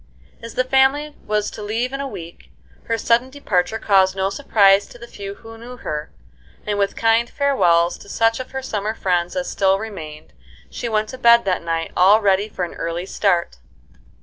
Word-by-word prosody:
As 230 -1 -9
the 255 - +2
family 270 +3 +2
was 210 0 0
to - - -9
leave 230 +5 -2
in 275 - -3
a 280 - -3
week, 170 -9 -10 0.4
her 230 - -1
sudden 235 +3 +2
departure 215 -8 -1
caused 190 -3 +3
no 195 0 -1
surprise 200 -6 +3
to - - -14
the 235 - -10
few 200 -3 -8
who 225 +1 -13
knew 245 +2 -10
her, 150 -9 -5 0.6
and 205 -1 -2
with 200 0 0
kind 230 +1 +2
farewells 175 -12 +2
to 200 - -14
such 225 +2 +1
of 255 - -6
her 265 0 -5
summer 215 -3 -3
friends 175 -3 -1
as 270 -1 -2
still 195 -1 +2
remained, 160 - -8 0.4
she 235 - -4
went 215 -1 0
to 260 - -8
bed 235 -2 +6
that 185 -2 0
night 165 -1 -3
all 195 +4 +6
ready 200 0 +1
for 185 -3 -3
an - - -10
early 170 +2 -4
start. 180 - 0
210 Hz, 195 wpm, -20 LUFS, 190-235 Hz, 0.6 s, bed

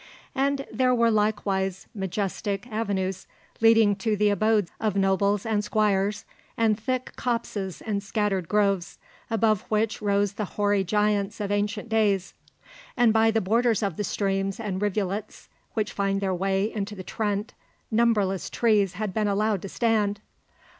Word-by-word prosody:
And 275 0 0
there 250 +2 +3
were 235 -1 +3
likewise 200 -3 0
majestic 195 +1 -3
avenues 195 -4 -2 0.3
leading 225 -2 +5
to 210 +1 0
the 210 +1 +3
abodes 210 -2 +2
of 215 -3 0
nobles 200 +1 +2
and 215 -2 0
squires, 210 -1 +1 0.3
and 225 -2 +3
thick 255 +4 -3
copses 220 -6 -3
and 205 -2 -2
scattered 200 -3 -1
groves, 200 -3 +1 0.3
above 220 -3 +2
which 215 0 0
rose 205 -1 +1
the 210 +1 -3
hoary 205 -1 +2
giants 210 +2 0
of 205 -1 -2
ancient 205 +2 -1
days; 210 -4 +1 0.6
and 240 -3 +5
by 225 0 +4
the 225 0 +1
borders 225 +2 +2
of 195 -5 -1
the 210 - -2
streams 195 0 -1
and 200 -4 -3
rivulets 205 0 -3 0.3
which 215 -2 -1
find 195 -1 0
their 195 -1 -1
way 195 +3 0
into 210 0 -4
the 185 - -7
Trent 205 +2 -2 0.4
numberless 215 -5 +2
trees 210 -5 +2
had 205 0 -3
been 215 +1 +1
allowed 205 -1 +1
to 195 - -6
stand. 210 -3 +1
210 Hz, 150 wpm, -26 LUFS, 195-220 Hz, 0.6 s, leading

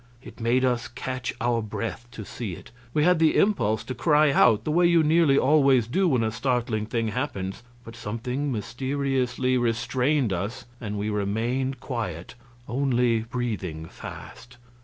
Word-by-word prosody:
It - - -12
made 125 +3 +2
us 125 -2 0
catch 130 +1 -4
our 120 -1 +1
breath 115 +2 -5
to 110 -4 -7
see 105 -4 -5
it. 85 - -11 0.2
We 150 +2 +1
had 180 0 +4
the 160 -1 +4
impulse 110 - +2
to 130 - -5
cry 150 +4 +3
out, 115 -5 +4
the 150 - -2
way 175 +2 +4
you 170 -2 +4
nearly 155 -2 +4
always 135 -4 +4
do 185 - +1
when 130 -8 +2
a 110 - 0
startling 115 -2 -1
thing 115 -1 -1
happens, 100 -7 -3 0.2
but 115 - -10
something 120 +5 -3
mysteriously 130 +2 -1
restrained 125 +1 +1
us 100 +8 -4 0.2
and 105 -3 -4
we 105 +1 -2
remained 115 +6 -1
quiet, 105 - -5 0.3
only 125 -2 +1
breathing 110 -9 -4
fast. 120 +7 -11
120 Hz, 160 wpm, -25 LUFS, 110-135 Hz, 0.3 s, had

